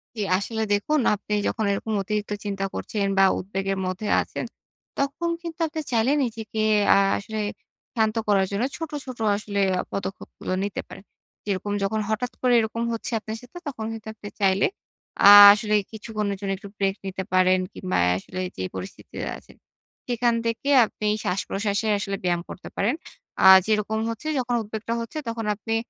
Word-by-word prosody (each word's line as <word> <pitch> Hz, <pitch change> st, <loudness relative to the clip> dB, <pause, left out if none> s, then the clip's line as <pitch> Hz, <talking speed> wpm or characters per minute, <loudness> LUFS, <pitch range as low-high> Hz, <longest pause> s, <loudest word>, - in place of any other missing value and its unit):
জি। -, -, -8 dB, 0.2 s
আসলে 220 Hz, +2 st, -3 dB
দেখুন, 300 Hz, +9 st, +1 dB, 0.2 s
আপনি 210 Hz, +1 st, -6 dB
যখন 220 Hz, -, -1 dB
এরকম 215 Hz, +2 st, -2 dB
অতিরিক্ত 210 Hz, +1 st, -3 dB
চিন্তা 195 Hz, -1 st, -2 dB
করছেন 205 Hz, -2 st, -2 dB
বা, 195 Hz, -, +6 dB, 0.2 s
উদ্বেগের 195 Hz, 0 st, -3 dB
মধ্যে 185 Hz, +3 st, -3 dB
আছেন, -, -, -5 dB, 0.5 s
তখন 280 Hz, +5 st, -1 dB
কিন্তু 335 Hz, -1 st, -7 dB
আপনি 315 Hz, 0 st, -4 dB
চাইলে 235 Hz, +3 st, +2 dB
নিজেকে 225 Hz, -2 st, -4 dB, 0.4 s
আ -, -, +5 dB, 0.2 s
আসলে 215 Hz, +2 st, -5 dB, 0.6 s
শান্ত 220 Hz, -1 st, +1 dB
করার 195 Hz, -2 st, +3 dB
জন্য 200 Hz, +3 st, -1 dB
ছোট, 325 Hz, -1 st, -5 dB
ছোট 255 Hz, -2 st, -8 dB, 0.2 s
আসলে 205 Hz, -1 st, -3 dB, 0.2 s
আ -, -, +2 dB
পদক্ষেপগুলো 195 Hz, -1 st, -5 dB
নিতে 200 Hz, 0 st, -3 dB
পারেন। -, -, -11 dB, 0.4 s
যেরকম 205 Hz, 0 st, -2 dB
যখন 215 Hz, +2 st, 0 dB
হঠাৎ 230 Hz, +3 st, -1 dB
করে 250 Hz, -1 st, +3 dB
এরকম 230 Hz, +1 st, -2 dB
হচ্ছে 230 Hz, -, -4 dB
আপনার 220 Hz, +1 st, -6 dB
সাথে, 245 Hz, +7 st, -13 dB
তখন 220 Hz, -6 st, -4 dB
কিন্তু 220 Hz, -1 st, -9 dB
আপনি 210 Hz, -1 st, -11 dB
চাইলে 190 Hz, 0 st, +3 dB, 0.6 s
আ -, -, +12 dB, 0.2 s
আসলে 210 Hz, 0 st, 0 dB, 0.2 s
কিছুক্ষণের 210 Hz, -2 st, -3 dB
জন্য 195 Hz, -1 st, -3 dB
একটু 200 Hz, +1 st, -11 dB
break 195 Hz, -1 st, +1 dB
নিতে 190 Hz, 0 st, -4 dB
পারেন 185 Hz, 0 st, +4 dB
কিংবা, 185 Hz, -1 st, -2 dB
এ -, -, +3 dB
আসলে 185 Hz, -, -7 dB, 0.2 s
যে 95 Hz, -, -3 dB
পরিস্থিতিতে 95 Hz, 0 st, -7 dB
আছেন। -, -, -18 dB, 0.5 s
সেখান 240 Hz, 0 st, +1 dB
থেকে 230 Hz, +4 st, -2 dB, 0.2 s
আপনি 210 Hz, -, -5 dB, 0.2 s
শ্বাসপ্রশ্বাসের 200 Hz, +3 st, -1 dB
আসলে 195 Hz, 0 st, -3 dB
ব্যায়াম 175 Hz, -1 st, +1 dB
করতে -, -, -9 dB
পারেন। 225 Hz, +8 st, +1 dB, 0.5 s
আ -, -, +6 dB, 0.2 s
যেরকম 215 Hz, 0 st, 0 dB
হচ্ছে 230 Hz, +6 st, -5 dB
যখন 245 Hz, -1 st, -1 dB
উদ্বেগটা 220 Hz, +2 st, -4 dB
হচ্ছে 230 Hz, +6 st, -7 dB
তখন 230 Hz, -1 st, -3 dB
আপনি 225 Hz, +2 st, -3 dB
215 Hz, 165 wpm, -24 LUFS, 195-230 Hz, 0.6 s, আ